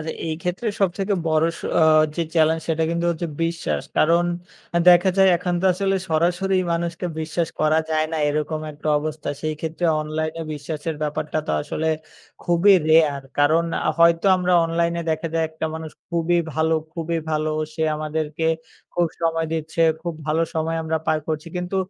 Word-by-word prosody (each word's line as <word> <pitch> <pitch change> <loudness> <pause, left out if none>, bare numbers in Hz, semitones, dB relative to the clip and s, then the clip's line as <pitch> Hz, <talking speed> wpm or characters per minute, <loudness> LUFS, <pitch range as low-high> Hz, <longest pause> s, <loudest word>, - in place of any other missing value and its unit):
আচ্ছা, 155 +1 -4
এই 160 - -1
ক্ষেত্রে 180 +6 -3
সবথেকে 195 +1 +1
বড় 155 0 +3 0.4
অ - - +5 0.3
যে 170 - +1
challenge 160 0 +3
সেটা 160 0 +1
কিন্তু 170 +1 -1
হচ্ছে 170 0 -3 0.2
বিশ্বাস, 165 0 -2
কারণ 170 +2 +4 0.6
দেখা 180 +2 +7
যায় 195 -1 +6
এখন 180 0 -2
তো 190 - +2
আসলে 195 0 0
সরাসরি 175 +4 +1 0.2
মানুষকে 170 +1 -2
বিশ্বাস 160 +1 -2
করা 155 +1 +3
যায় 155 0 +1
না, - - -1
এরকম 150 +1 -1
একটা 150 +1 -6
অবস্থা। 155 0 -5
সেই 155 0 -2
ক্ষেত্রে 160 +2 -3 0.2
অনলাইনে 155 +1 -3
বিশ্বাসের 150 +1 -5
ব্যাপারটা 150 +1 -2
তো - - -1
আসলে 160 +1 -2 0.6
খুবই 175 +4 +5 0.2
rare. 150 -4 +4
কারণ 155 +3 +4 0.2
আ - - +4
হয়তো 170 +2 +4
আমরা 180 0 0
অনলাইনে 170 +1 0
দেখা 160 +1 -1
যায় 165 0 +2
একটা 160 0 -4
মানুষ 160 -1 -6 0.2
খুবই 170 0 +1 0.2
ভালো, 160 +1 +2 0.2
খুবই 165 0 -2
ভালো, 155 0 0 0.2
সে 160 - -2
আমাদেরকে 155 +1 -3 0.5
খুব 175 0 +2
সময় 165 -1 0
দিচ্ছে, 160 +1 -3 0.2
খুব 170 -1 -3
ভালো 155 +2 +1
সময় 160 0 -1
আমরা 160 0 -1
পার 155 - +2
করছি। 155 +1 -3
কিন্তু 180 +2 -3
160 Hz, 165 wpm, -22 LUFS, 155-170 Hz, 0.6 s, দেখা